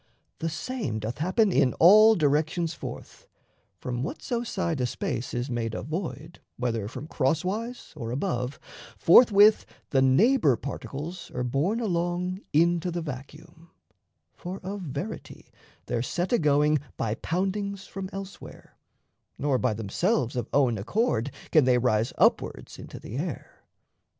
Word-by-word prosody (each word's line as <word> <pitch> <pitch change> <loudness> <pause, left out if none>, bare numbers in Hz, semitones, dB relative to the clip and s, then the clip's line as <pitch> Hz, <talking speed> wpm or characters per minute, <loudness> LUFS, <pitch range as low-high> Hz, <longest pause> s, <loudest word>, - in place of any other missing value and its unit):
The 165 - -1
same 160 - -3
doth 110 +5 -5
happen 190 +6 +2
in 130 -7 +2
all 215 +6 +7
directions 160 +2 +1
forth: - - -9 0.5
From 120 +5 -4
whatso 235 - -3
side 170 - -2
a 125 - +1
space 120 0 -3
is 120 +1 -2
made 115 -3 -3
a - - -4
void, 160 +1 -5 0.2
Whether 115 -4 -2
from 130 - -7
crosswise 185 - -2
or 115 -6 -5
above, 125 -1 -2 0.4
forthwith 210 +2 +6 0.3
The 135 - +3
neighbour 150 - +4
particles 145 +7 -6
are 125 - -1
borne 145 - 0
along 180 -2 -1
Into 170 +3 +2
the 170 -1 -3
vacuum; 155 +4 -9 0.6
for 185 +2 -7
of 195 +2 -5
verity, 165 +6 -7 0.3
They're 115 - -1
set 175 - -2
a 240 - +4
going 150 -1 +3 0.2
by 110 -2 -1
poundings 195 - -2
from 190 -1 -6
elsewhere, 195 0 -9 0.6
Nor 140 -3 +1
by 125 -4 +1
themselves 120 - 0
of 120 -2 -3
own 125 -6 +2
accord 120 - 0 0.2
can 155 -5 +5
they 125 -1 +4
Rise 115 -2 +1
upwards - - +1
into - - -9
the 115 - -7
air. 165 +4 -6
155 Hz, 140 wpm, -27 LUFS, 125-190 Hz, 0.6 s, all